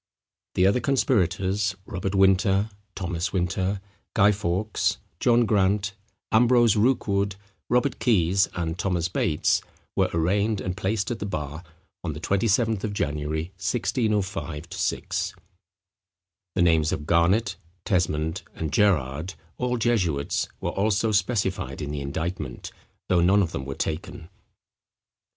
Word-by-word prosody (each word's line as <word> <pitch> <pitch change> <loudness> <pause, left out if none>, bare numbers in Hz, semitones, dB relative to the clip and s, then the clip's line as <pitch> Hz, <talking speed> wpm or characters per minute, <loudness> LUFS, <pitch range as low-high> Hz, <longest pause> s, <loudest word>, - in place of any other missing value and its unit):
The 90 - +4
other 100 +6 +4
conspirators, 100 -6 +1
Robert 95 +1 -3
Winter, 95 +2 +3 0.2
Thomas 90 -1 -2
Winter, 95 +2 0 0.4
Guy 100 -1 +6
Fawkes, 100 +1 0 0.2
John 120 -1 +4
Grant, 100 -1 +2 0.4
Ambrose 120 -1 +5
Rookwood, 100 -4 +1 0.3
Robert 125 +3 +1
Keys, 95 -5 +3
and 85 -1 -3
Thomas 90 -4 0
Bates, 75 -3 +1 0.3
were - - +2
arraigned 100 +6 +1
and 90 -2 -3
placed 105 +3 -1
at 115 - -3
the 105 - -3
bar 75 -3 -4 0.4
on 80 -3 -2
the 75 - -7
27th 105 +3 +1
of 105 -2 -2
January, 75 0 -2
1605 100 - -1
6. - - -2 1.2
The 95 - +2
names 80 -3 +3
of 75 - -3
Garnet, 95 +5 +2 0.3
Tesmond, 80 -4 0
and 80 -3 -4
Gerrard, 85 -3 +1 0.2
all 125 0 0
jesuits, 95 -12 0
were - - -2
also 105 +2 +1
specified 100 -2 0
in 75 - -4
the 75 -1 -3
indictment, 75 -1 -4 0.4
though 90 -2 +3
none 95 +4 +5
of 85 - -3
them 65 - -4
were 70 0 -5
taken. 80 +1 -4
95 Hz, 125 wpm, -25 LUFS, 85-105 Hz, 1.2 s, Guy